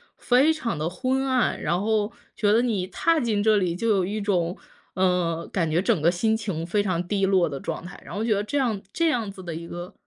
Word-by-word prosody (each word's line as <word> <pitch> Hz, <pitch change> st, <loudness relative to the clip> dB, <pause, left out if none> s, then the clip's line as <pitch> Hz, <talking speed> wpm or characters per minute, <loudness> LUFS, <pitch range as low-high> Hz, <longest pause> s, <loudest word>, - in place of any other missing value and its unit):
非 270 Hz, +6 st, +3 dB
常 235 Hz, -, -3 dB
的 155 Hz, +2 st, -1 dB
昏 260 Hz, +9 st, -1 dB
暗， 255 Hz, -2 st, +1 dB
然 175 Hz, +2 st, 0 dB
后 215 Hz, 0 st, +1 dB, 0.2 s
觉 210 Hz, -1 st, +2 dB
得 230 Hz, -, +4 dB
你 215 Hz, -7 st, 0 dB
踏 330 Hz, -, +1 dB
进 225 Hz, -6 st, 0 dB
这 215 Hz, 0 st, +4 dB
里 180 Hz, -4 st, 0 dB
就 230 Hz, +6 st, -2 dB
有 195 Hz, -4 st, +3 dB
一 210 Hz, +2 st, -3 dB
种 180 Hz, -4 st, 0 dB, 0.4 s
嗯， 180 Hz, -3 st, 0 dB
感 170 Hz, -4 st, 0 dB
觉 165 Hz, +3 st, +2 dB
整 180 Hz, -, +2 dB
个 165 Hz, +3 st, +3 dB
心 220 Hz, +5 st, +1 dB
情 180 Hz, -7 st, -3 dB
非 205 Hz, +4 st, +1 dB
常 180 Hz, -3 st, -1 dB
低 195 Hz, 0 st, +1 dB
落 185 Hz, -4 st, +3 dB
的 140 Hz, -1 st, -5 dB
状 -, -, -5 dB
态。 180 Hz, -, -10 dB
然 -, -, -9 dB
后 215 Hz, -, -1 dB
觉 225 Hz, -1 st, +2 dB
得 200 Hz, -, -1 dB
这 285 Hz, +6 st, -1 dB
样 230 Hz, -6 st, 0 dB
这 335 Hz, -, +2 dB
样 230 Hz, -7 st, -1 dB
子 195 Hz, -, -11 dB
的 170 Hz, -2 st, -5 dB
一 170 Hz, +1 st, -7 dB
个 175 Hz, +3 st, -7 dB
200 Hz, 260 characters per minute, -25 LUFS, 175-225 Hz, 0.4 s, 得